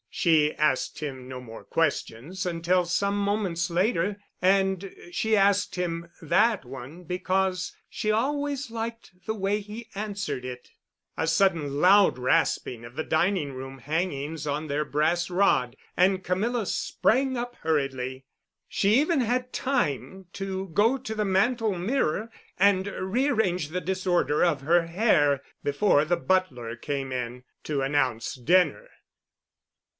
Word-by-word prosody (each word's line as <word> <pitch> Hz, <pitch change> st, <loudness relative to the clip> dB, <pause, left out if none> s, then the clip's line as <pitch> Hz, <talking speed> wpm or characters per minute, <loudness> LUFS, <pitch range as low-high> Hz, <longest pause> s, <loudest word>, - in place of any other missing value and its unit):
She 155 Hz, -3 st, +3 dB
asked 130 Hz, -4 st, 0 dB
him 130 Hz, -4 st, -6 dB
no 130 Hz, -1 st, -6 dB
more 115 Hz, -3 st, -10 dB
questions 165 Hz, +2 st, -2 dB
until 175 Hz, +1 st, +1 dB
some 200 Hz, +4 st, 0 dB
moments 200 Hz, -4 st, 0 dB
later, 190 Hz, +2 st, +1 dB, 0.2 s
and 190 Hz, 0 st, +2 dB, 0.2 s
she 220 Hz, +4 st, +1 dB
asked 200 Hz, 0 st, +3 dB
him 170 Hz, -2 st, -3 dB
that 195 Hz, -, +2 dB
one 135 Hz, +7 st, -9 dB
because 185 Hz, 0 st, -1 dB
she 215 Hz, -, -1 dB
always 280 Hz, +3 st, -1 dB
liked 230 Hz, 0 st, -5 dB
the 220 Hz, -, -2 dB
way 200 Hz, 0 st, 0 dB
he 215 Hz, +3 st, -9 dB
answered 200 Hz, -9 st, -3 dB
it. 125 Hz, -1 st, -8 dB, 0.5 s
A 160 Hz, -, 0 dB
sudden 160 Hz, -5 st, +2 dB
loud 195 Hz, -1 st, +6 dB
rasping 125 Hz, -1 st, +1 dB
of 120 Hz, +2 st, -11 dB
the 155 Hz, -, -2 dB
dining 160 Hz, -3 st, +1 dB
room 135 Hz, +1 st, -7 dB
hangings 150 Hz, +1 st, -3 dB
on 150 Hz, +2 st, -2 dB
their 145 Hz, +1 st, 0 dB
brass 160 Hz, +4 st, 0 dB
rod, 175 Hz, -10 st, +2 dB, 0.2 s
and 185 Hz, +1 st, +3 dB
Camilla 215 Hz, +6 st, 0 dB
sprang 260 Hz, +6 st, +1 dB
up 245 Hz, 0 st, -4 dB
hurriedly. 135 Hz, -4 st, -1 dB, 0.4 s
She 205 Hz, +2 st, +2 dB
even 305 Hz, -1 st, +2 dB
had 250 Hz, +2 st, -1 dB
time 190 Hz, -, -1 dB
to 195 Hz, -1 st, -4 dB
go 225 Hz, +8 st, +3 dB
to 250 Hz, -4 st, -6 dB
the 210 Hz, -1 st, 0 dB
mantel 210 Hz, +2 st, +2 dB
mirror 215 Hz, -, -1 dB, 0.3 s
and 195 Hz, 0 st, +4 dB
rearrange 200 Hz, -, 0 dB
the 180 Hz, +3 st, -3 dB
disorder 180 Hz, -5 st, +1 dB
of 170 Hz, -6 st, +2 dB
her 165 Hz, +4 st, +3 dB
hair 160 Hz, -, +3 dB, 0.2 s
before 145 Hz, +1 st, +3 dB
the 175 Hz, +2 st, +1 dB
butler 150 Hz, -11 st, 0 dB
came 135 Hz, +1 st, -4 dB
in 125 Hz, 0 st, -4 dB, 0.2 s
to 145 Hz, -3 st, -1 dB
announce 130 Hz, -5 st, 0 dB
dinner. 180 Hz, -, +2 dB
180 Hz, 135 wpm, -26 LUFS, 145-205 Hz, 0.5 s, loud